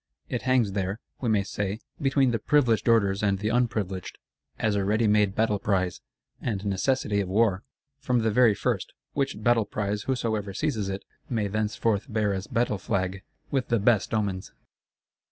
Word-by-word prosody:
It - - -2
hangs 130 -5 +2
there, 95 +2 -2 0.2
we 120 - -1
may 105 -2 +3
say, 100 +1 -3 0.2
between 135 -2 +3
the 115 - 0
Privileged 125 -3 +2
Orders 100 -4 +3
and 100 -2 +2
the 105 +3 -1
Unprivileged; 110 -6 -1 0.4
as 110 -2 +1
a 100 -1 +1
ready 110 +4 +2
made 105 -2 +3
battle 110 -2 +1
prize, 95 -3 0 0.4
and 105 -4 -2
necessity 100 +1 +1
of 95 - -4
war, 100 -1 +2 0.4
from 125 -3 +1
the 110 - +2
very 115 -1 +5
first: - - -2 0.2
which 140 -1 -2
battle 120 -3 +4
prize 105 0 -2
whosoever 110 -6 -1
seizes 110 -10 -1
it—may 100 +2 -4
thenceforth 110 0 0
bear 105 -2 +1
as 95 0 -4
battle 115 -4 0
flag, 95 0 -2 0.3
with 135 -3 0
the 115 - +2
best 105 0 +2
omens! 100 -4 -1
105 Hz, 165 wpm, -27 LUFS, 100-115 Hz, 0.4 s, very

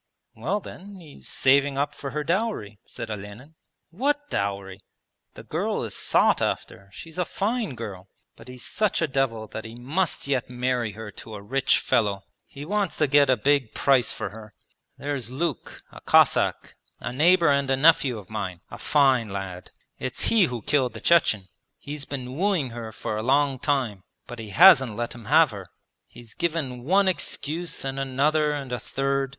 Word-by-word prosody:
'Well 160 - -2
then, 200 +1 -11
he's 155 -5 -13
saving 140 +1 +3
up 145 +1 0
for 140 - -6
her 150 +2 -3
dowry,' 170 - -2
said - - -7
Olenin. 105 +8 -8 0.4
'What 290 - -1
dowry? 100 -1 -3 0.6
The - - -10
girl - - -2
is - - -5
sought - - +2
after, 100 0 -3
she's 165 - -10
a - - +3
fine 210 - -2
girl. 100 -5 -8 0.3
But - - -15
he's 125 -1 -9
such 215 -3 0
a - - +2
devil 130 -5 -1
that 110 - -6
he 115 0 -9
must 150 +9 -1
yet 135 -4 -1
marry 125 -3 -1
her 110 0 -8
to 110 +2 -10
a 100 - -8
rich 135 +5 +2
fellow. 100 -3 0 0.2
He 140 +1 -9
wants 200 +1 -1
to 150 - +3
get 145 0 +4
a 130 - +4
big 140 0 +1
price 130 -4 +3
for - - -4
her. 110 -1 -12 0.4
There's 140 -5 -3
Luke, 145 +2 -4
a - - -13
Cossack, - - +3 0.3
a - - -5
neighbour 170 +5 +4
and 140 -1 +2
a 135 - +2
nephew 140 -4 +4
of 100 -4 -10
mine, 95 -5 -5
a - - -9
fine 135 -6 +3
lad. 95 -2 -6 0.3
It's 130 -1 +1
he 220 -5 +5
who 120 -7 -5
killed 130 -5 +1
the 110 - -8
Chechen 110 - +3 0.3
he 145 - -10
has 145 -2 -5
been 130 -2 -6
wooing 175 -7 0
her 115 -1 -7
for 110 0 -4
a - - -2
long 135 +2 +2
time, 125 -10 -1 0.2
but 120 - -9
he 110 -2 -7
hasn't 110 +3 +7
let 120 +1 -3
him 120 -2 -12
have 155 +3 +5
her. 100 -3 -8 0.4
He's 120 -2 -14
given 150 -8 -3
one 195 +5 +3
excuse, 170 -3 -2
and 135 0 -3
another, 145 +3 +1
and 140 -3 -5
a 125 - -2
third. 135 +3 -1
135 Hz, 185 wpm, -25 LUFS, 110-150 Hz, 0.6 s, hasn't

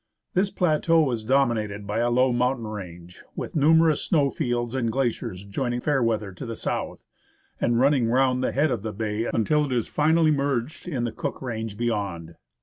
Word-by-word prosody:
This 190 +2 +2
plateau 165 -4 +2
is 115 -2 -3
dominated 110 -5 +1
by 105 +2 -2
a 120 +1 +2
low 125 +1 +3
mountain 125 0 0
range, 90 -5 -9
with - - -6
numerous 160 +1 +4
snow 145 -6 +2
fields 120 -4 -2
and 120 -4 0
glaciers 115 -7 -2
joining 120 +4 -2
Fairweather 115 -7 0
to 95 - -8
the 115 - -4
south, - - -4 0.6
and 120 0 +1
running 135 -2 +3
round 130 +1 +2
the - - 0
head 145 +1 +1
of 120 -5 -1
the 110 0 -5
bay 110 +1 -2
until 150 +7 +2
it 140 - -6
is 120 -3 0
finally 160 +1 +3
merged 140 +1 -1
in 135 -9 -2
the 120 - -1
Cook - - -4
range 110 -4 -5
beyond. 100 -8 -2
120 Hz, 180 wpm, -25 LUFS, 110-140 Hz, 0.6 s, numerous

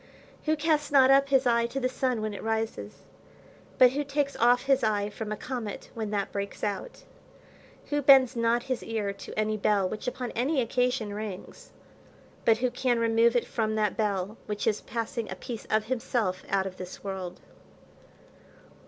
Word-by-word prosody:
Who 310 0 +2
casts 300 -1 0
not 270 -2 +6
up 275 0 +5
his 270 -1 +3
eye 235 -1 +3
to 270 +3 -4
the 255 - +1
sun 255 -3 -1
when 215 -1 -2
it 200 - -7
rises? 225 0 -3 0.7
but 250 -1 +7
who 290 +3 -1
takes 280 0 -1
off 245 +1 +4
his 270 -2 +2
eye 210 -1 +1
from 215 0 -6
a 215 - -2
comet 240 -5 -6
when 220 -2 -4
that 200 -1 -2
breaks 200 0 -5
out? 210 - -4 0.9
Who 290 0 +1
bends 265 -2 +6
not 235 +1 +1
his 255 -2 -2
ear 215 -3 -2
to 200 - -10
any 215 0 0
bell 200 -2 +2
which 215 +6 -6
upon 250 -1 -3
any 265 +5 0
occasion 245 -2 0
rings? 205 -3 -7 0.7
but 225 -1 +5
who 250 +1 0
can 245 -1 +1
remove 230 +1 +3
it 245 - +2
from 220 -2 -1
that 210 -3 +1
bell 205 -1 -1
which 210 -1 -3
is 215 -2 +1
passing 230 0 -4
a 185 - -5
piece 225 +4 -7
of 215 0 +1
himself 225 -6 -1
out 195 -1 +1
of 185 -1 -6
this 180 0 -9
world? 190 -3 -5
230 Hz, 180 wpm, -28 LUFS, 210-255 Hz, 0.9 s, but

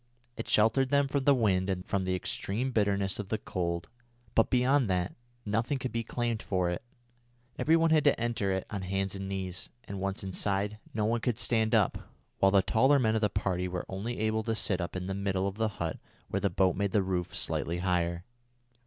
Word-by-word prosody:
It - - -6
sheltered 120 +5 +3
them 140 0 +3
from 135 -1 -1
the 140 - +6
wind 95 -6 +2
and 90 -1 -2
from 95 -1 -1
the 95 0 0
extreme 110 +7 -2
bitterness 100 -4 +1
of 100 -2 -5
the 110 - 0
cold, 85 -5 -3 0.5
but 115 - +4
beyond 130 -1 +3
that 90 0 0 0.3
nothing 115 +7 0
could 130 -1 -4
be 115 +1 -2
claimed 120 -1 -2
for 90 -4 0
it. 90 - -3 0.8
Every 160 - +4
one 165 0 +3
had 155 -2 +4
to 145 - +4
enter 115 -4 0
it 95 0 -1
on 100 -2 -3
hands 95 +1 -1
and 95 0 -5
knees, 95 -2 -4
and, 100 -6 -6
once 100 0 -2
inside, 100 +2 -1
no 110 -1 -1
one 115 +1 +1
could 120 -2 0
stand 110 -2 +2
up, - - +1 0.3
while 95 - +5
the 100 -1 +5
taller 130 +9 +4
men 110 -5 +2
of 110 - +1
the 105 - +3
party 90 -2 -1
were 90 -1 -4
only 105 +6 -4
able 110 0 +1
to 115 -1 0
sit 95 -4 +1
up 85 - -4
in 90 -1 -3
the 95 - -2
middle 95 -1 -1
of 100 +1 -5
the 110 0 +1
hut 85 -1 -3 0.3
where - - 0
the - - +2
boat 95 -2 +2
made 100 0 -1
the 105 -3 +3
roof 90 -2 -2
slightly 85 +1 -1
higher. 85 -1 0
100 Hz, 215 wpm, -30 LUFS, 95-115 Hz, 0.8 s, the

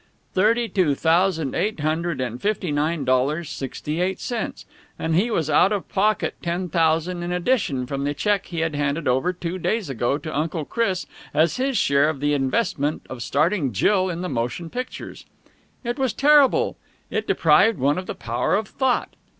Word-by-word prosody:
Thirty 230 +5 +3
two 175 -10 +1
thousand 165 -2 +2
eight 200 -2 -1
hundred 160 +2 -1
and 125 -1 -4
fifty 200 -5 -1
nine 150 +2 0
dollars, 140 +6 +1
sixty 150 +4 -4
eight 190 +1 -1
cents! 235 -3 -4 0.3
And 160 - -1
he 195 +9 +2
was 165 -9 0
out 155 +6 +4
of 205 -3 -2
pocket 210 +2 +1
ten 175 +1 -2
thousand 165 +2 +1
in 175 +1 -3
addition 180 - 0
from 140 +2 -3
the 145 +1 -1
cheque 205 +3 0
he 170 -3 -3
had 165 -1 -1
handed 145 +2 -1
over 130 +8 +2
two 180 0 -5
days 205 -3 -1
ago 120 +2 0
to 155 0 -6
Uncle 155 +1 -1
Chris 190 -6 -1 0.3
as 160 - +3
his 265 -1 0
share 140 +2 +3
of 155 -4 -4
the 145 +1 +1
investment 145 - 0
of 130 -2 -6
starting 150 - +1
Jill 185 - +2
in 170 -1 -4
the 180 - -2
motion 125 +5 -3
pictures. 250 +1 -6 0.6
It 240 +2 -3
was 260 -5 +1
terrible! 295 - +4 0.3
It - - -2
deprived 225 -2 +4
one 140 +5 +1
of 185 - -8
the - - -4
power 115 0 -1
of 210 0 -1
thought. 260 -2 0
170 Hz, 180 wpm, -23 LUFS, 145-200 Hz, 0.6 s, out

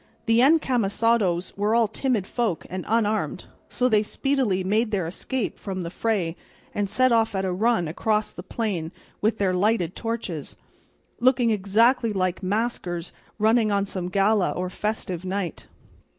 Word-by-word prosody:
The 230 -1 +3
encamisados 230 - +2
were 210 +3 +1
all 230 -1 +4
timid 235 -3 -1
folk 220 -6 -2
and 185 -1 -4
unarmed, 220 -1 0 0.2
so 250 - +1
they 215 -4 +4
speedily 230 -4 0
made 215 +4 +1
their 195 -5 -1
escape 215 +7 -3
from 190 -2 -4
the 170 - -5
fray 190 -6 -1 0.4
and 205 -1 -1
set 255 +5 +3
off 225 -2 +2
at 190 0 0
a 185 - 0
run 190 -2 +1
across 210 +6 0
the - - -8
plain 185 -5 -3 0.3
with 220 +1 +1
their 195 -3 +1
lighted 185 -2 +1
torches, 220 -10 -4 0.6
looking 245 -1 +3
exactly 225 +4 +3
like 185 -2 -1
maskers 185 -4 -2 0.2
running 220 0 +3
on 200 0 +1
some 185 -3 -4
gala 200 +1 +2
or 180 0 -3
festival 185 -4 -3
night. 190 -3 -3
210 Hz, 150 wpm, -25 LUFS, 185-230 Hz, 0.6 s, all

